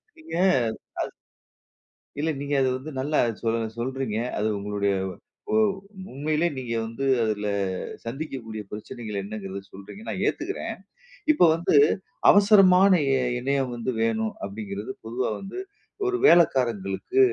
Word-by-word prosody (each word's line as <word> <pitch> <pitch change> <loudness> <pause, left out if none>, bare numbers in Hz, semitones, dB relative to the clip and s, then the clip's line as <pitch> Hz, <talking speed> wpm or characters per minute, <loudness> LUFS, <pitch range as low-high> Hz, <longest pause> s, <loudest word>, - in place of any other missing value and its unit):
நீங்க 320 0 -12 0.7
அது - - -5 1.1
இல்ல 155 +2 0
நீங்க 145 0 -3
அத 130 - +3
வந்து 145 +4 -8
நல்லா 150 +3 0 0.2
சொல் 115 0 +1 0.2
சொல்றீங்க. 130 -2 -2 0.2
அது 105 - +1
உங்களுடைய 100 0 0 0.6
ஒ - - +4 0.5
உண்மையிலே 150 +5 0
நீங்க 125 -3 -4
வந்து 115 +5 -4 0.2
அதுல 105 -1 -1 0.6
சந்திக்கக்கூடிய 115 -4 -5
பிரச்சனைகள் 105 0 -6
என்னங்கிறத 100 -1 -6
சொல்றீங்க. 100 - -10
நான் - - -3
ஏத்துக்கிறேன். - - -3 0.6
இப்போ 295 -12 +5
வந்து, 165 -1 +1 0.5
"அவசரமான 200 -2 +7 0.2
இ - - +2 0.3
இணையம் 135 0 0
வந்து 120 +2 -2
வேணும்." 110 -1 0
அப்பிடீங்கிறது 100 +1 -5
பொதுவா 120 +3 -1
வந்து 195 - -7 0.5
ஒரு 375 0 +1
வேலைக்காரங்களுக்கு, 125 - +3
125 Hz, 120 wpm, -25 LUFS, 105-155 Hz, 1.1 s, அவசரமான